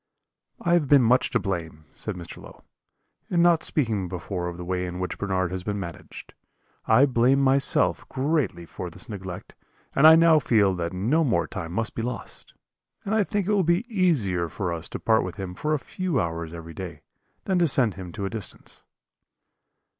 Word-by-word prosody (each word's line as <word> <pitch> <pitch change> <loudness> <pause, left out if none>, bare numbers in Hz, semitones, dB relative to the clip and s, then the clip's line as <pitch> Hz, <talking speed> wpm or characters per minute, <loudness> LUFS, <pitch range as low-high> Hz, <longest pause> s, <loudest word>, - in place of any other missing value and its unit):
"'I 170 - +3
have 170 -5 +3
been 140 -2 +6
much 125 +2 +3
to - - +1
blame,' 80 -5 -4
said - - -4
Mr. 85 -2 -9
Low, - - -14 0.7
'in 170 -2 +3
not 170 -2 +4
speaking 110 - 0
before 90 0 -4
of 85 -1 -6
the 90 - -7
way 90 0 -2
in 90 0 -6
which 90 - -4
Bernard 95 -3 -1
has 95 -1 -4
been 105 0 -3
managed. 85 -5 -9 0.5
I 120 +5 +6
blame 130 +1 +3
myself 135 0 +2
greatly 135 - -1
for 90 +2 -7
this 85 - -10
neglect, 95 -4 -7 0.4
and 145 +3 +6
I 160 - +10
now 165 -1 +6
feel 105 -8 +3
that 85 -2 -3
no 115 - +1
more 125 -7 +1
time 90 -7 -6
must 110 +5 -2
be - - -3
lost; 120 0 -6 0.5
and 205 - -1
I 220 -1 +3
think 205 -1 -2
it 210 - 0
will 205 -2 +3
be 175 +6 +1
easier 105 - +1
for 90 0 -3
us 85 0 -5
to - - -6
part 110 -1 +3
with - - -5
him 95 -3 -6
for 150 +11 -3
a - - +1
few 175 0 -2
hours 85 -3 -3
every 85 -1 -9
day, 90 0 -7 0.4
than 190 -2 +1
to 170 - +4
send 125 -7 +2
him 90 -1 -8
to 100 -2 -4
a - - -2
distance.' 110 -5 -7
105 Hz, 200 wpm, -25 LUFS, 90-145 Hz, 0.7 s, I